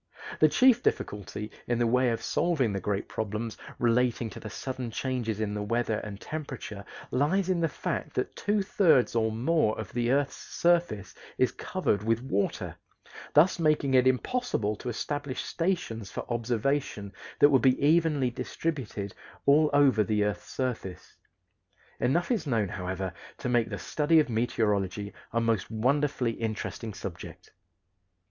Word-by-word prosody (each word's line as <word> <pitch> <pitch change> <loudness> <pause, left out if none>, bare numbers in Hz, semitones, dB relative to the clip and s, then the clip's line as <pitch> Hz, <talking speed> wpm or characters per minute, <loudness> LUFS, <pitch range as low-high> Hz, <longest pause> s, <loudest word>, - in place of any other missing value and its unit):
The 155 - +6
chief 255 - +5
difficulty 105 - -2 0.2
in 120 - +1
the 120 - +2
way 125 +2 +3
of 115 - -2
solving 150 -10 +1
the 100 - -1
great 100 +1 -2
problems 110 +1 -3 0.2
relating 120 -1 +1
to - - -8
the 110 - -7
sudden 130 +2 -5
changes 115 -3 -2
in 105 -1 -1
the 105 - -3
weather 115 +1 0
and 105 -1 -7
temperature 140 -10 -6 0.3
lies 170 +8 +1
in 185 -2 +2
the 165 - +2
fact - - -4
that - - -2
two 205 -1 0
thirds 170 -10 +3
or 110 -1 +2
more 120 +1 +1
of 110 - -6
the 120 0 0
earth's 140 0 +1
surface 170 - 0 0.2
is - - +3
covered 100 - -1
with 115 +2 0
water; 100 -6 -2 0.6
thus 170 +5 +5
making 150 -4 +2
it 130 0 +5
impossible 130 - 0
to 125 - -5
establish 145 +3 -3
stations 165 - -2
for - - -5
observation 115 -3 -1 0.2
that 145 - +7
would 135 -3 +4
be 130 -1 +4
evenly 150 -3 +3
distributed 125 -5 -4 0.3
all 150 +2 +5
over 140 -6 +5
the 105 -1 +1
earth's 105 -4 -3
surface. 110 -9 -4 0.8
Enough 170 - +1
is 210 -10 0
known, 110 -7 +1
however, 95 0 -4 0.2
to - - -4
make 120 -2 +2
the 105 - -4
study 160 +7 +2
of 150 -3 +2
meteorology 105 -4 0 0.2
a 115 - +1
most 115 -3 0
wonderfully 130 +2 +1
interesting 110 0 -4
subject. - - -8
120 Hz, 155 wpm, -28 LUFS, 110-145 Hz, 0.8 s, that